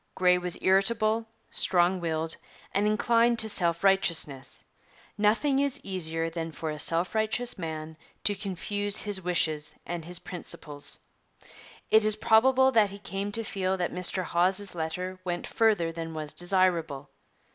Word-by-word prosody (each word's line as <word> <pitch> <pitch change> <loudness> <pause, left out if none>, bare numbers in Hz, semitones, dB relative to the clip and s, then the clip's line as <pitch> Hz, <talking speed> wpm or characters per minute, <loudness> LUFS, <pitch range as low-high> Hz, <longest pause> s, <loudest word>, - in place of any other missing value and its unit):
Grey 180 -1 +4
was 180 -1 -1
irritable, 215 +3 +2 0.2
strong 180 0 +3
willed, 160 -1 -2 0.4
and 205 +1 +2
inclined 230 +2 +3
to 220 - +1
self 170 -4 0
righteousness. 165 -9 +1 0.5
Nothing 230 +7 +2
is 280 0 +1
easier 165 -4 -2
than 165 0 -4
for 160 0 -4
a 150 - -6
self 170 +3 +1
righteous 220 +2 0
man 160 -1 -5 0.3
to 205 - +2
confuse 205 +1 -1
his 205 -2 -3
wishes 155 -4 0
and 170 -1 -4
his 175 +1 -5
principles. 155 -5 -4 0.9
It 220 0 +6
is 215 0 +3
probable 260 +5 +4
that 220 -5 +4
he 200 - -9
came 200 0 -4
to 230 - +1
feel 190 -2 -1
that 175 -1 -2
Mr 180 +1 -1
Hawes's 185 +3 +1
letter 180 +3 -4
went 175 -1 -3
further 210 -7 +2
than 165 -1 -6
was 155 -1 -4
desirable. 175 -6 +1
185 Hz, 145 wpm, -28 LUFS, 165-210 Hz, 0.9 s, It